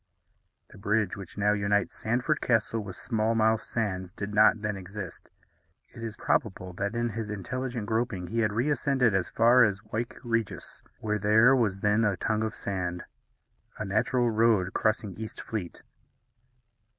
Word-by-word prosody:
The - - -14
bridge 105 -1 0
which 100 -1 -10
now 105 0 +3
unites 100 -3 0
Sandford 125 +7 0
Castle 115 -1 +1
with 100 -3 -8
Smallmouth 110 -1 +1
Sands 95 -5 -3
did 105 0 -5
not 110 +1 +5
then 105 -1 -1
exist. 100 -1 -8 0.6
It 115 - -10
is 110 -1 -5
probable 95 -8 -1
that 100 +4 -3
in 120 0 0
his 110 -1 -5
intelligent 120 +3 -4
groping 110 -4 -1
he 115 +6 -2
had 110 -2 +2
reascended 130 0 +1
as 95 -1 0
far 120 +2 +5
as 100 -2 0
Wyke 115 +2 -4
Regis, 115 -3 -3 0.2
where 105 -1 -1
there 110 +6 +5
was 105 -6 0
then 105 +2 +3
a 105 -4 +1
tongue 110 -1 0
of 110 -1 -3
sand, 90 -4 -3 0.7
a 110 - -3
natural 120 +5 +1
road 110 -4 +2
crossing 110 -2 0
East 110 -1 -6
Fleet. 100 -7 -5
110 Hz, 155 wpm, -28 LUFS, 100-115 Hz, 0.7 s, not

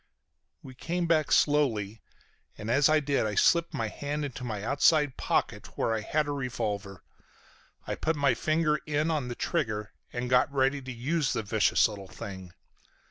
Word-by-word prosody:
" - - -50
We 130 - -10
came 170 +7 -2
back 160 -3 +2
slowly, 115 -8 +2 0.6
and 105 +2 -4
as 140 +4 +4
I 155 0 +4
did 140 -6 0
I 105 - -3
slipped 170 - +3
my 115 - -2
hand 145 +6 -4
into 130 -2 -7
my 110 -5 -4
outside 145 +2 +3
pocket - - -2
where 115 - +1
I 110 - -1
had 150 +7 0
a - - -2
revolver. 110 -8 -4 0.8
I - - -3
put 160 +1 -1
my 140 -3 +3
finger 155 -1 +1
in 150 +2 0
on 150 -5 -1
the 120 - -5
trigger 110 - -2 0.2
and 120 0 -3
got 125 +2 +3
ready 135 +1 +1
to 130 0 -7
use 135 +5 -1
the 115 - -2
vicious 105 +2 +3
little 100 -3 -9
thing. 95 -2 -8
130 Hz, 180 wpm, -28 LUFS, 110-150 Hz, 0.8 s, as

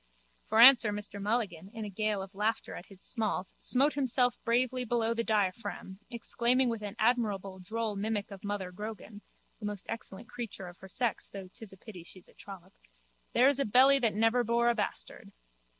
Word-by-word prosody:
For 220 - +1
answer 240 -3 +8
Mr 205 -1 -6
Mulligan, 200 -5 -1
in 220 -1 -5
a - - -5
gale 210 0 -1
of 190 +1 -11
laughter 210 +3 -2
at 180 - -9
his 195 -2 -12
smalls, 215 -5 0
smote 275 +4 +2
himself 255 -3 +2
bravely 250 +2 +1
below 230 -1 0
the 230 0 -1
diaphragm, 205 -2 -2
exclaiming 245 +1 +1
with 230 -2 -3
an 205 0 -6
admirable 210 -5 0
droll 220 +3 -3
mimic 205 0 -2
of 195 -1 -10
Mother 205 -3 -3
Grogan 210 +1 -8 0.4
(the 210 - -4
most 205 -2 -6
excellent 225 -1 -7
creature 235 -6 -7
of 175 0 -12
her 190 - -12
sex 240 +2 -1
though 195 -2 -9
'tis 220 -3 -10
pity 195 -6 -11
she's 180 +1 -14
a - - -21
trollop): 195 -3 -12 0.6
There's 270 +3 +4
a - - +3
belly 265 +6 +6
that 230 -5 +1
never 225 +3 +3
bore 235 +1 +2
a - - +3
bastard. 210 -3 -4
220 Hz, 180 wpm, -30 LUFS, 200-235 Hz, 0.6 s, answer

